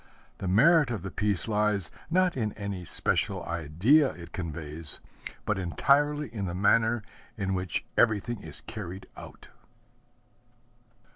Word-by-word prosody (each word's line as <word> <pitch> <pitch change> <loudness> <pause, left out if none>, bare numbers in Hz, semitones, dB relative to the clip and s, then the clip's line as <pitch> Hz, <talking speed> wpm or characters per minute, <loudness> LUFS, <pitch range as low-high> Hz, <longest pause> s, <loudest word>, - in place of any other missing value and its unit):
The 95 - -4
merit 145 - +5
of 110 -7 -4
the 95 - -5
piece 100 +2 -1
lies, 105 -3 +2 0.2
not 185 +1 +2
in 110 -5 -2
any 100 -3 -5
special - - +2
idea 85 - +3
it 85 0 -11
conveys, 80 -3 -5 0.5
but 105 -2 0
entirely 145 - +2
in 100 -4 -3
the 85 -1 -4
manner 110 +3 +2 0.3
in 95 -2 -1
which 95 -3 -2
everything 110 0 +1
is 80 -2 -3
carried 95 -4 -7
out. - - -12
100 Hz, 130 wpm, -28 LUFS, 90-120 Hz, 0.5 s, merit